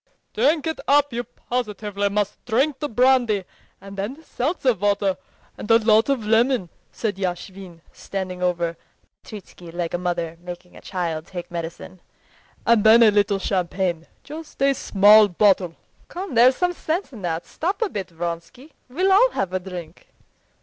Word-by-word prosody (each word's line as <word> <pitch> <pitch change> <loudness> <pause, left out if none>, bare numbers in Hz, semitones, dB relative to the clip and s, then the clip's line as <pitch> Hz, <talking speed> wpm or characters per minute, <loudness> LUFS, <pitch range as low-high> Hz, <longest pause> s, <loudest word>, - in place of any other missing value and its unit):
"Drink 285 +7 +2
it 320 0 -3
up; 285 -1 +3
you 240 +1 -2
positively 210 -5 -3
must 205 0 -2
drink 265 +5 +1
the 295 - -3
brandy, 245 -4 +3 0.4
and 195 0 -11
then 245 +11 -5
seltzer 270 -2 0
water 200 -1 0 0.4
and - - -7
a 225 - +7
lot 220 +2 +3
of 260 -6 0
lemon," 225 -3 +2 0.2
said 210 -4 -3
Yashvin, 185 -1 -5
standing 185 -2 -5
over 170 -2 -1 0.4
Petritsky 185 -4 -11
like 170 -1 -4
a 175 - -1
mother 170 -2 -3
making 175 0 -10
a - - -13
child 170 -4 -4
take 175 -2 -8
medicine, 170 +1 -7 0.6
"and 230 -3 +4
then 225 +2 +7
a 215 - +6
little 205 -1 +2
champagne—just 190 - -4
a 275 0 +4
small 210 -3 +6
bottle." 185 -2 +2 0.3
"Come, 370 -2 -6
there's 250 +2 +6
some 355 +3 0
sense 335 -1 -3
in 220 - -10
that. 170 -2 -3
Stop 390 +7 -2
a - - +1
bit, 200 - -5
Vronsky. 170 - -6 0.2
We'll 370 +9 +1
all 450 +6 +6
have 190 -2 -2
a 185 - 0
drink." 180 -3 -9
205 Hz, 155 wpm, -22 LUFS, 180-255 Hz, 0.6 s, a